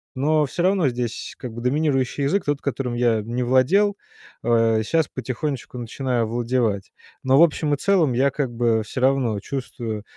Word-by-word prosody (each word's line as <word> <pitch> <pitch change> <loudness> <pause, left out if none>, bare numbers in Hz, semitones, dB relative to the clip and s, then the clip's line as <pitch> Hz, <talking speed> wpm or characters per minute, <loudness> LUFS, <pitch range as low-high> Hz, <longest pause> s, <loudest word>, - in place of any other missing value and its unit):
Но 150 +3 +2
всё 175 - -3
равно 185 -7 +3
здесь 120 -1 -4
как 125 -3 -7
бы 120 - -7
доминирующий 135 0 0
язык, 190 +8 +1
тот, 145 -1 -1
которым 130 -3 -3
я 120 -3 +2
не 120 +3 -3
владел, 180 +12 +3 0.5
э, 115 -1 +3
сейчас 160 +7 +1
потихонечку 130 +1 -5
начинаю 120 0 -2
овладевать. 115 -3 -1 0.3
Но 130 +1 +4
в - - +9
общем 150 -2 +1
и - - -10
целом 180 -8 +2
я 135 +3 +2
как 135 -2 -2
бы 115 -1 +1
всё 125 +4 -6
равно 130 -5 +2
чувствую 115 -4 -5
130 Hz, 170 wpm, -22 LUFS, 120-145 Hz, 0.5 s, в